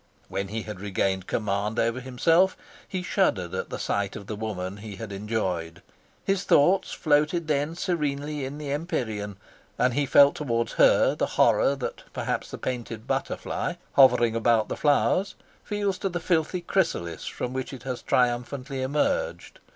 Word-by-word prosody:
When 100 0 -2
he 110 +2 -4
had 105 -4 -7
regained 95 -1 -1
command 105 0 -1
over 115 +2 +1
himself, 165 +9 +2 0.3
he 185 -1 -4
shuddered 105 - +1
at - - -3
the - - -4
sight 100 -1 -1
of 100 - -7
the 105 - -5
woman 100 -3 -4
he 105 -1 -8
had 105 +1 -7
enjoyed. 95 -5 -3 0.4
His 195 0 +1
thoughts 185 +3 +4
floated 155 +2 +1
then 150 +2 0
serenely 150 -5 -2
in 135 +2 -5
the 150 -2 -5
empyrean, 110 - -3 0.4
and 125 0 +2
he 145 +2 +1
felt 140 +2 +7
towards 115 -5 -1
her - - +5
the - - -1
horror 140 - +4
that 135 - -5
perhaps - - -2
the - - -6
painted 120 -3 -4
butterfly, - - -2 0.2
hovering 125 -4 +5
about 115 -1 +2
the - - -2
flowers, 155 +6 +2 0.3
feels 205 -3 -1
to 195 - -1
the 175 -1 -3
filthy 170 +1 0
chrysalis 165 - -1
from 125 - -4
which 130 0 -3
it 130 -3 -9
has 130 -2 -4
triumphantly 125 +2 0
emerged. 150 - -1
130 Hz, 160 wpm, -26 LUFS, 110-150 Hz, 0.4 s, felt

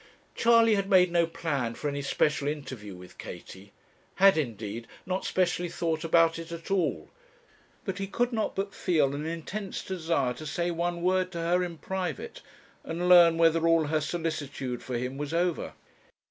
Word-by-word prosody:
Charley 230 -1 +5
had 200 -1 0
made 185 -3 +5
no 170 -1 +3
plan 140 -8 -2
for 150 - -4
any 140 0 -2
special 145 +1 +1
interview 130 -9 -5
with 90 0 -14
Katie; 100 +1 -10 0.4
had, 195 +1 +6
indeed, 115 -5 -3 0.2
not 185 +1 -2
specially 175 -1 0
thought 165 -1 -2
about 165 0 +3
it 165 0 -8
at 170 +3 -7
all; 190 -3 0 0.7
but 190 -2 -3
he 195 - -2
could 245 +5 0
not 220 -2 -1
but 195 0 -3
feel 150 -7 +1
an 150 +2 -4
intense 185 +5 -5
desire 165 -8 -1
to 155 +4 -8
say 175 +4 -1
one 170 0 -2
word 185 0 +2
to - - -5
her 175 +2 +1
in 170 -2 -5
private, 180 -1 -4 0.4
and 170 +2 -3
learn 170 -2 +7
whether 165 0 +4
all 165 -1 +4
her 155 +1 0
solicitude 145 -6 -3
for 125 -2 -3
him 125 +3 -4
was 150 +2 -3
over. 175 -1 0
165 Hz, 175 wpm, -28 LUFS, 145-180 Hz, 0.7 s, learn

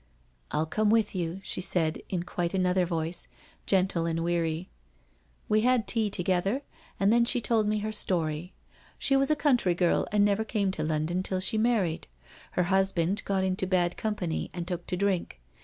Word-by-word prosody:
' - - -38 0.2
I'll 155 - +1
come 215 +6 +1
with 220 -1 +2
you,' 175 0 -3
she - - -2
said 175 -3 +1
in 180 -3 -2
quite 175 0 -2
another 185 -1 +2
voice, 165 0 -3 0.2
* - - -30
gentle 185 -3 +2
and 165 0 -1
weary. 170 0 -1 0.8
We 215 0 +3
had 245 -1 +2
tea 220 -3 +1
together, 195 +7 +1 0.4
and 200 +2 +4
then 235 0 +5
she 245 +1 +3
told 225 -2 +1
me 215 0 +1
her 215 - -2
story. 175 -4 -1 0.5
She 275 - +1
was 270 0 +3
a 305 - +4
country 255 - +2
girl 175 -1 +2
and 205 0 +4
never 205 +1 +2
came 210 -3 0
to 160 -5 -3
London 155 +3 -1
till 185 0 -2
she 200 +4 -1
married. 215 -8 +1 0.5
Her 180 - +2
husband 190 +1 +1
got 195 -1 0
into 190 0 -1
bad 180 -2 +1
company 200 -7 -2
and 175 -1 -4
took 175 -2 -4
to 180 - -2
drink. 190 - -1
185 Hz, 190 wpm, -28 LUFS, 175-210 Hz, 0.8 s, then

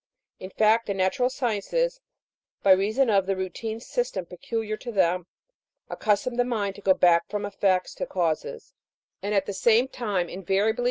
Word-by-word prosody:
In 185 - -7
fact, 220 +3 +2
the 200 - -1
natural 195 +7 +1
sciences, 275 - -1 0.6
by 195 - +5
reason 215 +8 +3
of 195 -2 +2
the 195 - +1
routine 205 +4 -4
system 230 - -3
peculiar 215 +5 -4
to 240 +2 -7
them, 180 -3 +1 0.6
accustom 215 +4 0
the 245 - +4
mind 215 -5 -2
to - - -11
go 190 -1 +4
back 170 -1 +3
from 205 -1 -3
effects 195 -2 0
to - - -3
causes, 175 - -2 0.5
and 205 +1 -2
at 195 - +2
the 200 - -4
same 235 +5 +3
time 205 -9 -2
invariably 195 +5 0
PREFACE. - - -7
205 Hz, 170 wpm, -26 LUFS, 190-230 Hz, 0.6 s, by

